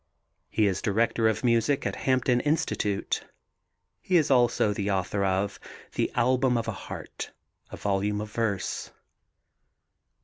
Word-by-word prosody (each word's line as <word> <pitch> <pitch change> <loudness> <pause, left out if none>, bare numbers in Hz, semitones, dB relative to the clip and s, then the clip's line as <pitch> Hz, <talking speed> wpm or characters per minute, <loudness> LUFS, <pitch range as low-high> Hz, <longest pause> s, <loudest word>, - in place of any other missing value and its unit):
He 110 - +2
is 95 -2 0
director 110 +2 +2
of 110 +2 -2
music 120 +4 +2
at - - -1
Hampton 125 -1 +3
Institute. 125 -9 -1 0.7
He 185 - +3
is 155 -4 +2
also 120 -4 +3
the 100 0 -2
author 100 +1 0
of 95 +1 0 0.3
The - - 0
Album 125 +1 +3
of 115 - -2
a - - 0
Heart, 95 - -7 0.4
a - - -8
volume 100 +1 0
of 105 0 -5
verse. 105 -4 -2
110 Hz, 135 wpm, -27 LUFS, 100-125 Hz, 0.7 s, Hampton